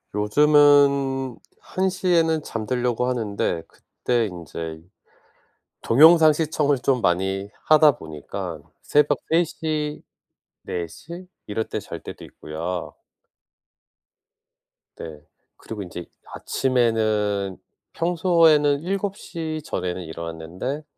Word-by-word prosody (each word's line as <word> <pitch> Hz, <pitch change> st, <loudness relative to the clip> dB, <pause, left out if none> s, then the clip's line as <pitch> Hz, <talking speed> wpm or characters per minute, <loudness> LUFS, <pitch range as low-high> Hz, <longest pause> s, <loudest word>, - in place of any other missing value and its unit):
요즘은 140 Hz, +2 st, +4 dB, 0.2 s
1:00 185 Hz, 0 st, -2 dB
에는 160 Hz, -2 st, +3 dB
잠 110 Hz, -2 st, -5 dB
들려고 125 Hz, 0 st, 0 dB
하는데 105 Hz, -8 st, -2 dB
그때 120 Hz, -2 st, -2 dB
인제 80 Hz, -3 st, -7 dB, 1.0 s
동영상 160 Hz, +4 st, +7 dB
시청을 150 Hz, -3 st, 0 dB
좀 130 Hz, -2 st, +1 dB
많이 95 Hz, +1 st, 0 dB, 0.2 s
하다 155 Hz, -1 st, +6 dB
보니까 80 Hz, -, -7 dB, 0.2 s
새벽 145 Hz, -1 st, +2 dB
3:00, 155 Hz, -2 st, -1 dB, 0.6 s
4:00 170 Hz, -, -7 dB, 0.2 s
이럴 110 Hz, +2 st, -3 dB
때 -, -, -3 dB
잘 -, -, -8 dB
때도 -, -, -9 dB
있고요. 85 Hz, +3 st, -6 dB, 2.0 s
네. 75 Hz, -2 st, -9 dB, 0.4 s
그리고 110 Hz, -2 st, -8 dB
인제 90 Hz, -1 st, -8 dB, 0.3 s
아침에는 110 Hz, -6 st, 0 dB, 0.4 s
평소에는 165 Hz, -4 st, +3 dB
7:00 180 Hz, -4 st, -4 dB
전에는 90 Hz, 0 st, -3 dB
일어났는데 85 Hz, -, -6 dB
130 Hz, 180 characters per minute, -23 LUFS, 95-155 Hz, 2.0 s, 동영상